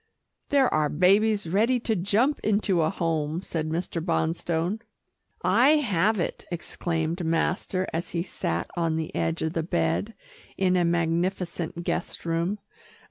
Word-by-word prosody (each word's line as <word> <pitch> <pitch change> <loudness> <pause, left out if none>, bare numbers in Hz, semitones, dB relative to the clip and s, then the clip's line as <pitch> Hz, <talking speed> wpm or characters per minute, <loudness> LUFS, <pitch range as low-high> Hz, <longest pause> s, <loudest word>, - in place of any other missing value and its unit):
"There 275 -2 +4
are 155 -1 +2
babies 200 +6 +3
ready 220 +9 +2
to 225 -2 0
jump 210 +10 +2
into 200 -4 +1
a 155 - +2
home," 165 -2 -1
said 155 -4 -3
Mr. 165 0 -2
Bonstone. 170 +3 0 0.6
"I 240 +11 +5
have 215 - +2
it," 170 - -2
exclaimed 170 0 -2
master 175 +3 0
as 165 +2 -2
he 170 -1 -1
sat 85 - -3
on 165 -2 0
the 160 -1 -3
edge 80 -1 -1
of 160 0 -1
the 165 - 0
bed, 85 - -1 0.4
in 185 -1 +2
a 180 - +3
magnificent 170 0 -1
guest 175 - -3
room. 170 +4 0
170 Hz, 140 wpm, -26 LUFS, 160-195 Hz, 0.6 s, I